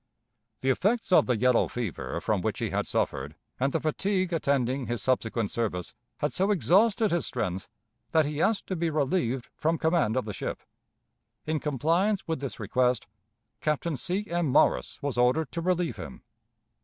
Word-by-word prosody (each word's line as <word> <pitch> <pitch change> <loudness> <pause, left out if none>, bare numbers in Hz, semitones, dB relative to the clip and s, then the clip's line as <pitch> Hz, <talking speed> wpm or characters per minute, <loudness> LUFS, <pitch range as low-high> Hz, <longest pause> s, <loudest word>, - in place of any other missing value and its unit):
The 130 - +3
effects 210 - 0
of 180 - +6
the 125 -3 +2
yellow 125 +1 +3
fever 90 - -4
from - - 0
which - - -1
he - - -2
had - - -1
suffered 70 +3 -1 0.2
and 135 +2 +1
the - - 0
fatigue 185 +3 0
attending 135 -4 0
his 120 -1 -2
subsequent 115 -4 0
service 100 -7 -2 0.2
had 150 - -1
so 190 +2 +1
exhausted 210 +3 +3
his 170 -4 0
strength 95 +1 -3 0.4
that 160 -2 +3
he 150 +1 -2
asked 220 +1 +2
to 190 - -3
be 170 -1 0
relieved 140 -4 0
from 165 +2 0
command 160 -9 +2
of 130 - 0
the 105 - -4
ship. - - -5 0.8
In 155 0 0
compliance 165 - +1
with 160 -3 -1
this 135 -6 -5
request, 125 -2 +1 0.5
Captain 155 +1 -1
C. 185 +9 -2
M. 170 -1 0
Morris 135 - +2
was 140 -4 -1
ordered 125 +4 +2
to 170 - -3
relieve 175 -8 0
him. - - -9
150 Hz, 170 wpm, -28 LUFS, 125-175 Hz, 0.8 s, of